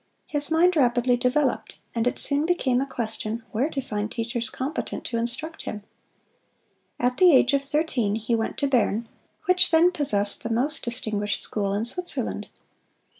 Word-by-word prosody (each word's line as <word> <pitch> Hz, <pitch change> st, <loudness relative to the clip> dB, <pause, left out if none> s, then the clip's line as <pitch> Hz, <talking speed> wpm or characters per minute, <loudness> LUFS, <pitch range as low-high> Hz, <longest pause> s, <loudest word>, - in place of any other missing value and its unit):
His 290 Hz, 0 st, -1 dB
mind 340 Hz, +3 st, +4 dB
rapidly 245 Hz, -3 st, +3 dB
developed, 250 Hz, +2 st, 0 dB, 0.2 s
and 230 Hz, 0 st, 0 dB
it -, -, 0 dB
soon 290 Hz, +2 st, +2 dB
became 265 Hz, -8 st, +1 dB
a 275 Hz, -, -2 dB
question 225 Hz, -2 st, -3 dB
where 250 Hz, +7 st, 0 dB
to 280 Hz, -4 st, -3 dB
find 210 Hz, -3 st, -4 dB
teachers 235 Hz, 0 st, -2 dB
competent 280 Hz, +5 st, -4 dB
to 230 Hz, -, -2 dB
instruct 250 Hz, +8 st, -3 dB
him. 210 Hz, -1 st, -6 dB, 1.2 s
At 250 Hz, +1 st, +1 dB
the 365 Hz, -1 st, +7 dB
age 280 Hz, 0 st, +5 dB
of 280 Hz, 0 st, +2 dB
thirteen 275 Hz, -8 st, 0 dB
he 225 Hz, +2 st, -2 dB
went 225 Hz, -1 st, -1 dB
to 280 Hz, -, +1 dB
Bern, 235 Hz, -3 st, +1 dB, 0.4 s
which 365 Hz, 0 st, +5 dB
then 340 Hz, +2 st, +5 dB
possessed 205 Hz, -, +1 dB
the 230 Hz, -, -4 dB
most 260 Hz, +7 st, -1 dB
distinguished 215 Hz, -4 st, -2 dB
school 200 Hz, -2 st, -2 dB
in 210 Hz, +3 st, -1 dB
Switzerland. 355 Hz, +9 st, -3 dB
250 Hz, 165 wpm, -25 LUFS, 225-295 Hz, 1.2 s, the